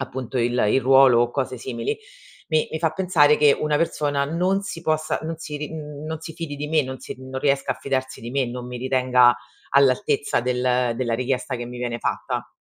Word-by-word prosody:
appunto 130 -1 -5
il 120 0 +1 0.2
il 135 - +3
ruolo 130 -2 +6
o 120 0 +2
cose 130 -2 -3
simili, 115 -2 -3 0.5
mi 155 -1 +2
mi 160 - -2
fa 165 -2 +2
pensare 160 -4 +3
che 145 -2 +5
una 150 -1 +1
persona 145 -3 0
non 180 +6 0
si 190 -4 -6
possa 155 -1 0
non 160 +1 -4
si 150 -2 -6
ri 150 - -4
mhmm, 150 -2 -7
non 160 0 -4
si 160 - -8
fidi 165 -4 -5
di 150 - -4
me, 155 0 +2
non 130 -1 -6
si - - -7
mhmm, 130 +1 -11
non 130 0 -4
riesca 140 -1 +1
a - - -12
fidarsi 130 -1 -2
di 115 - -7
me, 135 -1 0
non 125 +1 -6
mi 125 0 -6
ritenga 125 -1 +4 0.3
all'altezza 140 0 +2
del 125 -1 +1
della 120 -2 -1
richiesta 130 +2 -2
che 120 - -6
mi 125 0 -8
viene 120 -1 -3
fatta. - - -3
135 Hz, 220 wpm, -23 LUFS, 125-150 Hz, 0.5 s, ruolo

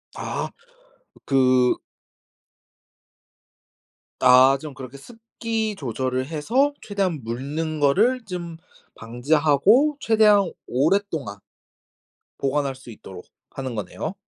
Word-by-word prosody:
아. - - -4 0.8
그 130 -2 +3 2.4
아 130 +2 +6
좀 150 -2 -8
그렇게 130 0 -10
습기 225 - -5
조절을 130 - -3
해서 230 - 0
최대한 190 - -2
묽는 145 +7 -4
거를 220 - +2
좀 175 -4 -6 0.4
방지하고 155 - +2
최대한 210 -6 +3 0.2
오랫동안 150 - -1 1.0
보관할 140 0 -1
수 130 -2 -13
있도록 95 -4 -12 0.2
하는 130 -2 -6
거네요. 110 - -5
150 Hz, 190 characters per minute, -23 LUFS, 130-205 Hz, 2.4 s, 아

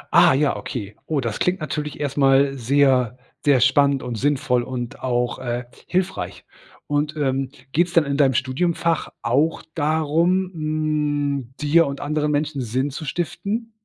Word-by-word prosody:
Ah - - +7
ja, 145 0 +2
okay. 105 -6 -6
Oh, 150 -4 0
das 115 -3 -3
klingt 180 0 +1
natürlich 150 -1 -4
erst 145 -1 -3
mal 135 0 +4
sehr, 130 -1 +2 0.3
sehr 140 -3 +4
spannend 140 +3 +3
und 125 - -4
sinnvoll 135 +1 +1
und 120 -1 -5
auch, 120 -1 -1
äh, 120 -1 -3 0.2
hilfreich. 185 +1 -2 0.4
Und, 145 +1 -1
ähm, 135 -2 0 0.2
geht's 175 +2 +1
dann 165 -3 +4
in 140 0 -1
deinem 135 -4 +3
Studiumfach 165 +5 0
auch 145 +8 +1
darum, 160 +4 +1
hm, 150 -4 -1
dir 150 +2 +4
und 140 0 -5
anderen 150 0 -1
Menschen 145 -1 -1
Sinn 130 +4 -1
zu 155 +3 -6
stiften? 200 - -3
145 Hz, 150 wpm, -22 LUFS, 130-155 Hz, 0.4 s, Ah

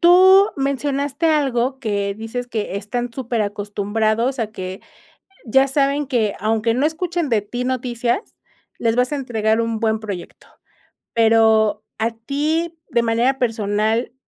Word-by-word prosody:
Tú 375 +3 +7
mencionaste 280 +2 -1
algo, 265 -3 +1
que 200 -5 -2
dices 225 +3 -5
que 215 -4 -3
están 235 +4 -3
súper 240 -3 -2
acostumbrados 210 +4 -1
a 220 - -1
que 185 -2 -6 0.7
ya 265 +4 +4
saben, 280 +1 +1
que 230 -6 +1
aunque 220 +2 +1
no 260 +5 +1
escuchen 340 -1 -2
de 225 -3 +2
ti 245 +5 -5
noticias, 245 - -1 0.6
les 230 -1 +1
vas 250 +2 +1
a - - 0
entregar 225 -4 0
un 230 -1 -2
buen 220 -1 +1
proyecto. 200 -5 -8 0.7
Pero 220 -2 +4 0.2
a 225 +1 +1
ti, 300 +8 -2
de 235 - +2
manera 235 +4 +1
personal, 220 0 0
235 Hz, 140 wpm, -20 LUFS, 220-270 Hz, 0.7 s, Tú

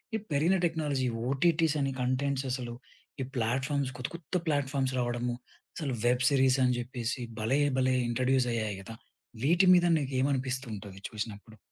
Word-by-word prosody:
ఈ - - 0
పెరిగిన 160 +7 +3
technology 150 -6 0 0.2
OTTs 160 +2 +2
అని 135 -1 0
కంటెంట్స్ 135 +2 0
అసలు 125 -2 -3 0.5
ఈ - - -1
ప్లాట్‌ఫార్మ్స్ 130 +4 0
కొత్త 125 - -3
కొత్త 170 +1 -7
ప్లాట్‌ఫార్మ్స్ 140 -3 0
రావడము 120 0 -1 0.4
అసలు 145 -6 -2
వెబ్ 125 +1 +3
సిరీస్ 135 -2 +4
అని 125 -1 +2
జెప్పేసి 120 0 -3 0.2
భలే! 125 +7 +1 0.2
భలే! 130 0 +3
ఇంట్రొడ్యూస్ 125 +1 +2
అయ్యాయి 110 -3 -2
గదా! 115 +3 -9 0.5
వీటి 175 +5 +5
మీద 175 -1 +4
నీకేమనిపిస్తు 130 -1 -1
ఉంటుంది 100 -1 -9
చూసినప్పుడు? 110 0 -7
130 Hz, 145 wpm, -30 LUFS, 120-140 Hz, 0.5 s, వీటి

